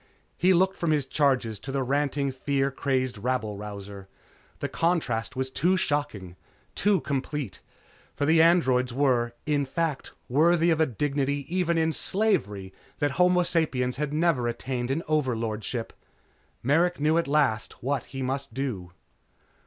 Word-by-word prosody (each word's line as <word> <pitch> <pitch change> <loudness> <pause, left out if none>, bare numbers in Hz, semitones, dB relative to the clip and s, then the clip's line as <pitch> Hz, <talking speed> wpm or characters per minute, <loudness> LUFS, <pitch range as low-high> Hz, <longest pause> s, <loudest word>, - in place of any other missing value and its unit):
He 185 +3 +3
looked 190 +2 +3
from 170 - 0
his 150 -3 +2
charges 130 -6 +1
to 135 - -7
the 135 -1 0
ranting 140 +1 0
fear 135 +1 -1
crazed 130 -4 -1
rabble 110 -2 -1
rouser. 100 -1 -8 0.5
The - - -3
contrast 130 -9 -1
was 130 0 -2
too 180 +7 +2
shocking, 110 - -2 0.4
too 205 -2 +2
complete. 140 - -3 0.5
For 145 - 0
the 160 +2 +5
"androids" 130 -7 +3
were, 120 -3 +1
in 145 -2 +1
fact, 150 +1 -3
worthy 165 +5 +3
of 160 -1 +2
a 160 - +4
dignity 140 +3 -1
even 170 -2 +1
in 160 0 +2
slavery 105 - 0 0.2
that 145 -1 0
homo 180 +3 +3
sapiens 130 -7 0
had 150 0 -2
never 155 -6 +1
attained 120 +1 -3
in 150 +5 -1
overlordship. 115 -6 -2 0.7
Merrick 165 +7 +2
knew 155 +3 +3
at 170 - -2
last 140 -9 0
what 135 -1 -1
he 135 -1 -6
must 135 -1 -3
do. 105 -11 -4
140 Hz, 145 wpm, -26 LUFS, 125-160 Hz, 0.7 s, the